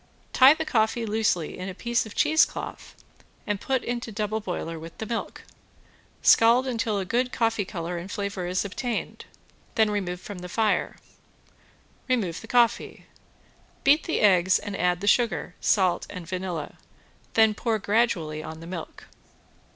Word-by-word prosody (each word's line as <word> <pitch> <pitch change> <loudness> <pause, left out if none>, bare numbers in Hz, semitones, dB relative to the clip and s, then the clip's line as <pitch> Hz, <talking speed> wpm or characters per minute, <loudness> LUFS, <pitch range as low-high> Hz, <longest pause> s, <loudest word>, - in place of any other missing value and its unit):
Tie 270 +3 +8
the 320 - -3
coffee 225 -2 +1
loosely 210 -7 -1
in 185 +1 -4
a 185 - -7
piece 235 +2 -1
of 210 - -12
cheesecloth 315 +1 +1 0.5
and 205 -2 -2
put 265 -2 0
into 240 -1 -4
double 215 +1 -2
boiler 165 -4 -5
with 165 +1 -11
the 220 - -5
milk. 230 +1 -5 0.8
Scald 235 +3 +6
until 230 -4 -1
a 195 - -2
good 245 +5 0
coffee 225 -3 0
color 175 -1 -4
and 185 +4 -8
flavor 200 -3 -3
is 180 +2 -1
obtained, 230 +4 -4 0.5
then 220 -1 +3
remove 180 -4 -2
from 200 0 -8
the 180 0 -8
fire. 215 +2 0 1.1
Remove 210 -10 -1
the 225 - -11
coffee. 240 -1 +1 0.8
Beat 285 +3 +4
the 325 - -1
eggs 185 -3 +5
and 205 -1 -6
add 180 -1 0
the - - -3
sugar, 230 -5 +2
salt 185 -4 +2
and 180 -4 -8
vanilla, 180 -4 -5 0.6
then 220 -1 +5
pour 225 +2 -1
on 215 - -4
gradually 195 -9 0
the 160 +1 -8
milk. 170 -2 -8
205 Hz, 155 wpm, -26 LUFS, 180-230 Hz, 1.1 s, Tie